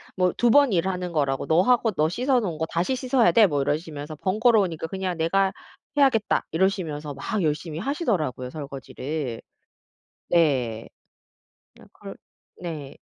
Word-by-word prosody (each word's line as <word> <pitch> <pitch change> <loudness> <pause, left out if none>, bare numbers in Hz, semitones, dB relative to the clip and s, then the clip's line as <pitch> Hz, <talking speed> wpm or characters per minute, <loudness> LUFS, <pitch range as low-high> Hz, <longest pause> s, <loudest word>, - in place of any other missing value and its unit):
뭐 180 -1 +2
2 240 -1 +3
번 285 0 +5
일하는 180 0 -1
거라고. 140 -4 -1
"너 160 +2 +4
하고 240 +1 +3
너 155 -5 +1
씻어 250 +7 +1
놓은 180 -9 -3
거 160 - 0
다시 175 +10 0
씻어야 255 -2 +3
돼." 225 -3 +6
뭐 145 -5 0
이러시면서 150 +1 -3
"번거로우니까 195 - +2
그냥 185 0 -3
내가 190 +4 +2 0.5
해야겠다." 260 -7 +3
이러시면서 160 -5 -1
막 215 +6 -3
열심히 155 0 -2
하시더라고요 185 - -2
설거지를. 140 -2 -5 0.9
네. 130 -9 +1 0.9
아 - - -15
그럴 - - -10 0.4
네. 155 -6 -6
170 Hz, 305 characters per minute, -24 LUFS, 150-215 Hz, 0.9 s, 돼